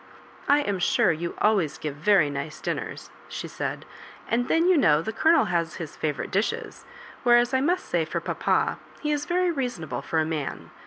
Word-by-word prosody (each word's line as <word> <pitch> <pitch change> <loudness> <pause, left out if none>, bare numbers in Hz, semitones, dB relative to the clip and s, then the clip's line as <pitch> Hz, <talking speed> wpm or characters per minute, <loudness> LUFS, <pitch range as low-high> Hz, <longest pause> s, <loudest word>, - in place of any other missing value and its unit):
"I 290 +1 +5
am 200 -8 -2
sure 195 +2 +3
you 170 +1 -4
always 195 -9 +2
give 150 -2 -4
very 165 -2 +3
nice 145 +2 -5
din - - -2
ners," - - -8 0.2
she - - -5
said; - - -4 0.5
'^and 245 +2 +1
then, 330 +2 +3
you 370 - +5
know, 155 - +4
the 220 - -4
Colonel 320 +8 +4
has 170 -2 -1
his 160 -4 -7
favourite 150 -3 -3
dishes 200 +4 -2 0.2
— 475 - -18
whereas, 240 0 +4
I 260 - +3
must 355 +6 +1
say 170 -2 0
for 155 - -3
papa, - - 0 0.2
he 300 -2 -2
is 295 +1 -1
very 360 0 +2
reasonable 250 - -3
for 165 - -3
a 160 - +3
man. 155 -3 -4
205 Hz, 200 wpm, -26 LUFS, -, 0.5 s, I